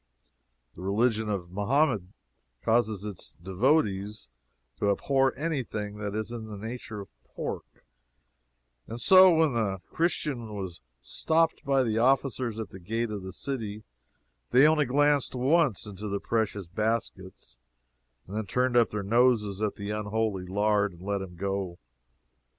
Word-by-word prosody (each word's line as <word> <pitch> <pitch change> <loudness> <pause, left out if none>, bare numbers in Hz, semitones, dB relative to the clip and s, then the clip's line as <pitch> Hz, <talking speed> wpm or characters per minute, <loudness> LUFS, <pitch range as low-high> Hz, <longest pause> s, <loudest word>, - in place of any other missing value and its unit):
The - - -11
religion 110 +3 +1
of 90 -4 -3
Mahomet 110 +4 +2 0.6
causes 110 -3 +2
its 105 -4 -7
devotees 100 - 0 0.5
to 100 - +2
abhor 135 +6 +2
anything 120 -9 -3
that 105 -1 -4
is 110 +1 -3
in 115 -2 -6
the 105 -1 -7
nature 110 0 -6
of 95 - -11
pork, - - -7 1.0
and 115 - -6
so 185 +5 +8
when 160 -4 +3
the 105 -5 0
Christian 135 -9 -1
was 95 -4 -6 0.2
stopped 160 - +1
by 135 -1 +2
the 115 -2 0
officers 130 -2 +1
at 110 -2 -5
the 95 - -10
gates 115 +5 -2
of 105 -2 -4
the 95 0 -7
city, 110 -4 -4 0.7
they 130 +4 +6
only 155 -1 +3
glanced 145 +1 +2
once 135 - +2
into 105 0 -6
his 100 - -2
precious 105 -4 -1
baskets, 95 - -3 0.7
then 105 +2 -4
turned 125 +4 +1
up 120 -1 +5
their 105 -1 -3
noses 110 -2 +2
at 105 -1 0
the 100 0 -5
unholy 105 -2 -2
lard, 105 0 +1
and 85 +1 -14
let 100 0 -1
him 90 -2 -8
go. 95 -1 -3
110 Hz, 145 wpm, -28 LUFS, 100-125 Hz, 1.0 s, so